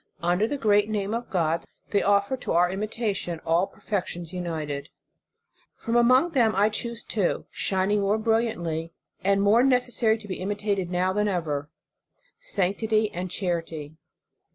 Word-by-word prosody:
Under 180 +5 +2
the 285 - -2
great 210 -3 +3
name 205 -1 -1
of 235 +1 -3
God, 165 -4 0 0.3
they 200 - +3
offer 200 +4 +2
to 255 - -4
our 175 +1 +4
imitation 205 -4 -2
all 170 +4 +2
perfections 180 -4 -4
united. 155 -5 -4 0.9
From 230 - -3
among 255 +8 +5
them 235 - +3
I 205 +2 +4
choose 235 +2 -4
two, 200 -5 -1
shining 195 +2 0
more 200 +2 +2
bril 225 +1 +2
liantly, 165 -5 -4 0.3
and 200 +1 +3
more 215 +4 +5
necessary 245 -4 +2
to 215 -2 -12
be 185 - -4
imitated 200 -2 -1
now 180 +1 +1
than 210 +1 +1
ever: 155 -6 -2 0.7
sanctity 215 - 0
and 180 +1 -4
charity. 165 -5 -3
200 Hz, 150 wpm, -26 LUFS, 175-220 Hz, 0.9 s, among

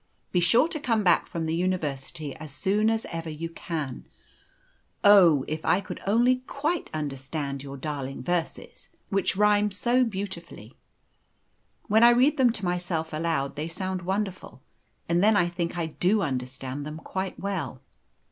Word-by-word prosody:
Be 180 - +2
sure 230 - +5
to 325 -3 -3
come 230 -7 +1
back 175 -3 +4
from 165 -1 -3
the 160 - -1
university 155 -5 -2
as 155 -2 -9
soon 205 +9 +1
as 225 0 0
ever 165 -1 -4
you 160 +2 -5
can. 155 - -5 1.0
Oh! 175 -9 +7
if 155 +1 -4
I 195 - +2 0.2
only 240 +5 +4
could 255 - -20
quite 310 +5 -2
understand 140 -1 -4
your 140 0 -8
darling 135 -2 -5
verses, 175 +1 -3 0.2
which 195 -1 0
rhyme 210 0 +4
so 240 +6 +2
beautifully. 190 - -6 1.1
When 220 +2 +4
I 235 - +9
read 255 +5 +4
them 255 -3 +5
to 215 -4 -4
myself 175 -3 -2
aloud 155 -4 -1
they 155 +2 -3
sound 185 +2 -3
wonderful, 190 +1 -4 0.4
and 170 +2 +2
then 215 0 +5
I 175 - +3
think 175 0 -3
I 170 - 0
do 185 +6 +1
understand 130 0 -4
them 150 +1 -6
quite 190 +3 -5
well. 170 -11 -4
175 Hz, 155 wpm, -26 LUFS, 150-205 Hz, 1.1 s, I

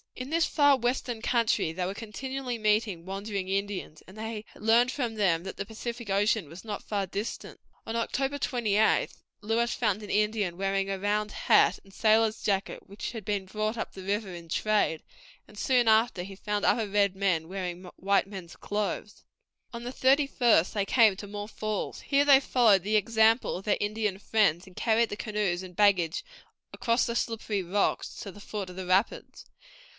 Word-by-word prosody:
In 255 +3 -7
this 330 0 +3
far 285 -2 +4
western 245 -1 -2
country 230 -8 +1
they 180 +2 -3
were 190 - -3
continually 250 +4 -5
meeting 210 -5 0
wandering 195 0 -4
Indians, 195 -5 -3
and 190 +4 -14
they 220 0 -5
learned 235 +3 +3
from 245 -6 -2
them 175 -6 +1
that 190 - -7
the - - -3
Pacific 230 +1 -6
Ocean 200 -3 +1
was 175 +6 -11
not 210 -2 -5
far 200 -2 -2
distant. 200 +5 -6 0.3
On 225 - -4
October 270 +4 -1
28th 220 -5 +1 0.2
Lewis 230 +2 0
found 215 -3 0
an 205 - -8
Indian 210 -4 0
wearing 195 0 0
a 195 - -1
round 210 +1 0
hat - - +4
and 195 - -19
sailor's 220 +1 +3
jacket, 195 -1 -2
which 200 +1 -6
had 225 -3 -7
been 200 -1 -2
brought 215 +3 -2
up - - -4
the 190 - -9
river 200 0 -2
in 170 -1 -10
trade, 210 -4 +1 0.5
and 210 - -16
soon 245 +1 +2
after 220 -4 +3
he 195 +1 -9
found 205 +1 -2
other 225 -3 +2
red 200 -1 +2
men 185 -5 0
wearing 180 -1 -5
white 195 0 +1
men's 190 -4 -9
clothes. 210 0 -4 0.5
On 235 0 -7
the 245 - -4
thirty 270 +2 +3
first 235 -10 +3
they 200 -2 0
came 220 -2 +5
to 205 +2 -8
more 205 0 -6
falls. 215 -1 -4
Here 285 0 +2
they 280 -2 +8
followed 230 -8 +3
the 210 +2 0
example 220 +2 +3
of 190 - -10
their 210 - +2
Indian 210 -1 -1
friends, 200 -5 +2
and 185 - -15
carried 230 0 +2
the 205 - -5
canoes 210 -5 -1
and 180 -1 -11
baggage 185 -5 +3 0.5
across 235 0 +1
the 235 - -3
slippery 220 -4 -2
rocks 195 +3 -1
to 200 - -7
the 205 - -14
foot 200 -2 -5
of 180 - -10
the 190 0 -5
rapids. 190 +4 0
210 Hz, 185 wpm, -28 LUFS, 195-225 Hz, 0.5 s, they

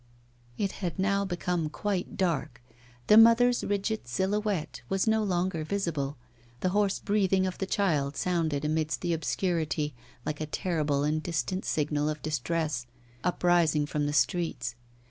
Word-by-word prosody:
It 200 -2 0
had 175 -4 -2
now 200 +1 +1
become 175 -3 -1
quite 195 +2 -3
dark; 160 -9 -1 0.5
the 210 - +6
mother's 230 +2 +6
rigid 205 - -1
silhouette 190 - -1
was 195 -1 +1
no 220 -1 +3
longer 180 -4 0
visible; 155 -6 -2 0.4
the 185 - +2
hoarse 200 0 +2
breathing 195 -2 +2
of 185 - -4
the 195 - -2
child 150 -9 0
sounded 160 -5 0
amidst 155 +1 0
the 175 -1 0
obscurity 160 -2 -1 0.3
like 150 0 -3
a 155 - -2
terrible 150 -4 0
and 155 +1 +1
distant 170 +3 -2
signal 150 0 0
of 150 0 -4
distress, 150 -2 -1 0.4
uprising 175 -4 +3
from 145 0 -1
the - - -1
streets. 170 0 0
170 Hz, 145 wpm, -29 LUFS, 150-195 Hz, 0.5 s, the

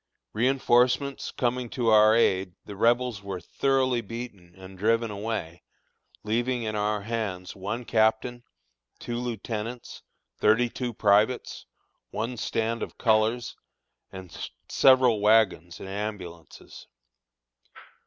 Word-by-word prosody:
Reënforcements 130 +2 +2
coming 125 -1 -1
to 120 -1 -1
our 110 0 +6
aid, 95 -5 +1
the 100 - -8
Rebels 120 +1 +1
were 100 -2 -5
thoroughly 130 +5 0
beaten 105 -6 -9
and 95 0 -12
driven 115 +3 +1
away, 100 -5 -5 0.6
leaving 120 +3 -1
in 110 -1 -3
our 105 0 0
hands 100 -5 -4
one 105 +6 -5
captain, 110 +2 +1 0.6
two 120 - -5
lieutenants, 115 0 -5 0.4
thirty 115 +3 +3
two 125 -2 -4
privates, 105 +3 +1 0.4
one 115 +3 -3
stand 115 +1 -2
of - - -6
colors, 110 +1 +1 0.6
and 95 -3 -8 0.2
several 130 -4 +4
wagons 100 -5 +2
and - - -8
ambulances. 95 -5 -7
110 Hz, 110 wpm, -26 LUFS, 100-120 Hz, 0.6 s, our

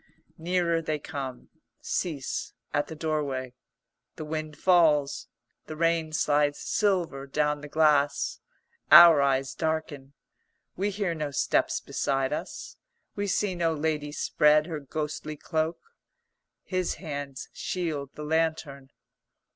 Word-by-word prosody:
Nearer 170 0 +1
they 155 -1 -2
come; 135 -3 -7 0.3
cease 150 -7 -3 0.2
at 145 0 +1
the 160 - -8
doorway. 145 -5 -2 0.6
The 155 - -6
wind 155 0 -5
falls, 160 -6 +3 0.4
the 155 - -6
rain 165 0 +1
slides 145 -1 +2
silver 175 -10 0
down 150 +1 0
the 150 - -8
glass. 145 -2 +2 0.5
Our 170 -4 +10
eyes 135 -1 +1
darken; 155 -4 -3 0.6
we 200 +3 0
hear 200 -3 -2
no 155 -2 -3
steps 140 - +1
beside 135 0 -1
us; - - -6 0.4
we 205 0 -2
see 195 0 0
no 165 -2 0
lady 150 -1 -2
spread 150 0 +3
her 160 -3 -5
ghostly 150 +1 -5
cloak. 160 +2 -1 0.9
His 185 -2 -2
hands 145 -5 -6
shield 155 -6 -3
the 150 - -7
lantern. 155 -4 -1
155 Hz, 120 wpm, -27 LUFS, 145-165 Hz, 0.9 s, Our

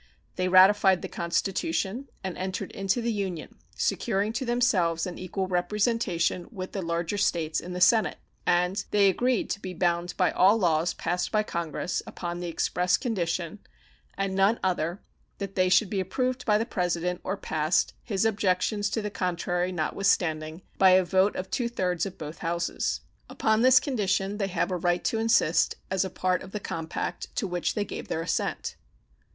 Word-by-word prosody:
They 185 0 0
ratified 190 0 +6
the - - -3
Constitution 200 - -2 0.2
and 190 -2 -4
entered 185 0 -4
into 195 +5 -1
the 235 0 0
Union, 190 -6 -4 0.2
securing 210 0 0
to 260 +3 -2
themselves 190 -9 +2
an 180 -2 -6
equal 185 +1 -3
representation 185 -1 0
with 185 -4 -6
the 195 - -3
larger 170 +3 -2
States 165 -5 +1
in 180 - -7
the 180 - -4
Senate; 220 +4 +4 0.3
and 180 +3 +1
they 205 -1 +4
agreed 245 +4 +1
to - - -2
be 185 -2 -7
bound 175 0 0
by 180 - +3
all 195 +4 +5
laws 170 -4 +1
passed 175 0 -2
by 215 -1 +2
Congress 170 -2 -3
upon 175 -1 -5
the 175 - -4
express 180 +2 +1
condition, 180 - -2 0.6
and 195 -1 -1
none 195 +4 +3
other, 175 -1 -1 0.3
that 195 -1 -5
they 185 -1 +2
should 200 +3 +4
be 200 - 0
approved 250 +7 -2
by 210 -1 +5
the 225 - -1
President 180 -4 -1
or 190 +2 -2
passed, 155 +1 0
his 205 -2 -1
objections 205 0 +1
to 220 - -2
the 210 - -3
contrary 180 -1 -1
notwithstanding, 160 -1 0 0.2
by 190 - +7
a 185 0 +5
vote 190 +3 +2
of 185 +1 -5
two 240 -2 0
thirds 180 -6 -1
of 190 - -9
both 155 +1 -7
Houses. 170 0 -2 0.3
Upon 220 0 +1
this 255 +1 +7
condition 205 -6 -1
they 195 - 0
have 185 0 -1
a 180 - 0
right 175 0 0
to 225 - 0
insist 225 -8 +3 0.2
as 190 0 +2
a 190 - -3
part 185 0 0
of 190 - -11
the 210 - -2
compact 165 -4 -4
to 240 - -1
which 180 -2 -2
they 210 -2 0
gave - - -7
their 165 - -2
assent. - - -2
185 Hz, 180 wpm, -27 LUFS, 175-205 Hz, 0.6 s, by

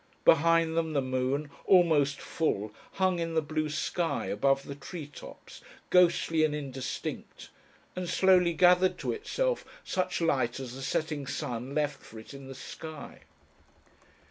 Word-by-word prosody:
Behind 165 +1 +4
them 160 -1 0
the 140 - +2
moon, 130 +3 -1 0.2
almost 155 -7 +4
full, 110 -10 -2 0.2
hung 185 -2 +1
in 165 -1 -2
the - - +5
blue 155 +1 -2
sky 160 +3 -1
above 135 +6 +1
the 140 - -7
tree 150 +3 -8
tops, 145 -1 -12 0.3
ghostly 170 -3 +4
and 150 -1 +1
indistinct, 135 -2 -6 0.4
and 180 -1 -4
slowly 180 -2 +4
gathered 180 +2 +4
to - - -2
itself - - -1 0.2
such 185 -1 -1
light 130 -7 +1
as 130 -2 -6
the 135 - -8
setting 145 +1 -2
sun 130 -1 -4
left 145 -2 -1
for 110 - -13
it 110 +5 -11
in 135 -1 -10
the 135 - -8
sky. 155 +2 -9
150 Hz, 145 wpm, -29 LUFS, 135-170 Hz, 0.4 s, the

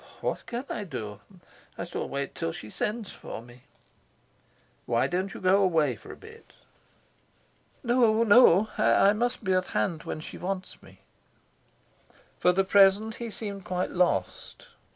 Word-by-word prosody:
"What - - -3
can 240 +3 -4
I 210 - -4
do? 105 - -7 0.6
I - - -4
shall 175 - -5
wait 140 0 -4
till 80 - -3
she 105 +5 -9
sends 215 -1 -3
for - - -8
me." 120 +2 -16 1.2
"Why 120 0 +2
don't 185 +2 -2
you - - -7
go 190 +2 +3
away 160 -9 +2
for - - -12
a - - -9
bit?" 455 +1 -15 1.3
"No, 235 -2 +3
no; 215 -3 +6
I 200 - +5
must 240 +2 -2
be 190 -2 +1
at 185 0 +1
hand 165 -4 0
when - - -5
she 155 - -9
wants 185 +1 -5
me." - - -18 1.4
For 180 - +4
the 190 +2 +2
present 200 +3 +4
he 235 -1 -5
seemed 205 -3 -6
quite 180 0 -2
lost. 180 - -1
190 Hz, 150 wpm, -27 LUFS, 170-220 Hz, 1.4 s, no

